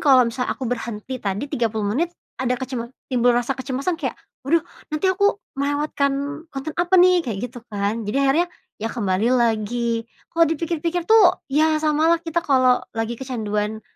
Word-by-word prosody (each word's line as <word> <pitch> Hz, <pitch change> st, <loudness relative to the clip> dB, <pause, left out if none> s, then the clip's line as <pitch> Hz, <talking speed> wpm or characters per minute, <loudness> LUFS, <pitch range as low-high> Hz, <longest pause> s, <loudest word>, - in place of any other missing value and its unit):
kalau 265 Hz, -4 st, +6 dB
misalnya 250 Hz, +2 st, -2 dB
aku 265 Hz, -, -5 dB
berhenti 240 Hz, +1 st, -4 dB
tadi, 200 Hz, +4 st, -2 dB
30 215 Hz, -3 st, -1 dB
menit, 335 Hz, +3 st, +1 dB, 0.3 s
ada 250 Hz, -1 st, +1 dB
kecema 250 Hz, -2 st, -4 dB, 0.2 s
timbul 245 Hz, -1 st, +3 dB
rasa 245 Hz, +2 st, +1 dB
kecemasan 275 Hz, +6 st, -2 dB
kayak, 265 Hz, -5 st, -2 dB, 0.3 s
waduh 330 Hz, +2 st, +3 dB, 0.3 s
nanti 310 Hz, +5 st, 0 dB
aku 405 Hz, +2 st, +2 dB, 0.2 s
melewatkan 285 Hz, +1 st, -1 dB
konten 275 Hz, +3 st, -5 dB
apa 350 Hz, +1 st, +2 dB
nih? 360 Hz, 0 st, +6 dB
Kayak 215 Hz, -4 st, -3 dB
gitu 245 Hz, -1 st, -10 dB
kan, 205 Hz, +2 st, -1 dB
jadi 275 Hz, +5 st, +1 dB
akhirnya 335 Hz, +6 st, +3 dB, 0.3 s
ya 225 Hz, -, -1 dB
kembali 205 Hz, -1 st, 0 dB
lagi. 230 Hz, 0 st, 0 dB, 0.3 s
Kalau 335 Hz, 0 st, +5 dB
dipikir-pikir 330 Hz, +2 st, -1 dB
tuh 410 Hz, -5 st, +6 dB, 0.2 s
ya 310 Hz, +1 st, +4 dB
samalah 315 Hz, +2 st, +3 dB
kita 335 Hz, +1 st, 0 dB
kalau 255 Hz, -3 st, +4 dB, 0.2 s
lagi 225 Hz, +1 st, -1 dB
kecanduan 215 Hz, -4 st, -2 dB
265 Hz, 160 wpm, -22 LUFS, 230-315 Hz, 0.3 s, kalau